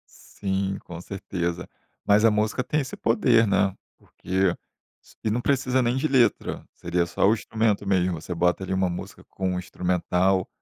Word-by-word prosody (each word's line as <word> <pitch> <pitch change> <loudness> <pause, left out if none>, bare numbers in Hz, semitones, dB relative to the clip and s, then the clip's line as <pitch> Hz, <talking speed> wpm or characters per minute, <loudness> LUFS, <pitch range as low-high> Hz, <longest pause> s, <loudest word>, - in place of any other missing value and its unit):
Sim, 95 0 -3
com 85 -1 -8
certeza. 90 -2 -4 0.4
Mas 105 +2 +4
a 115 - +7
música 105 +4 0
tem 150 +4 0
esse 130 - -6
poder, 115 0 +3
né? 100 -1 +2 0.2
Porque 95 -1 -1 0.5
s - - -21
e 110 - 0
não 120 - 0
precisa 130 -1 +1
nem 120 +1 +1
de 145 +4 +1
letra. 130 -4 +1
Seria 85 0 -1
só 90 - +2
o 105 - +5
instrumento 110 -2 0
mesmo. 90 -4 +1
Você 90 - -5
bota 90 +2 +1
ali 95 - -3
uma 95 -1 +1
música 85 - -8
com 95 -1 -3
um 90 - -1
instrumental 90 +1 0
95 Hz, 175 wpm, -25 LUFS, 90-115 Hz, 0.5 s, a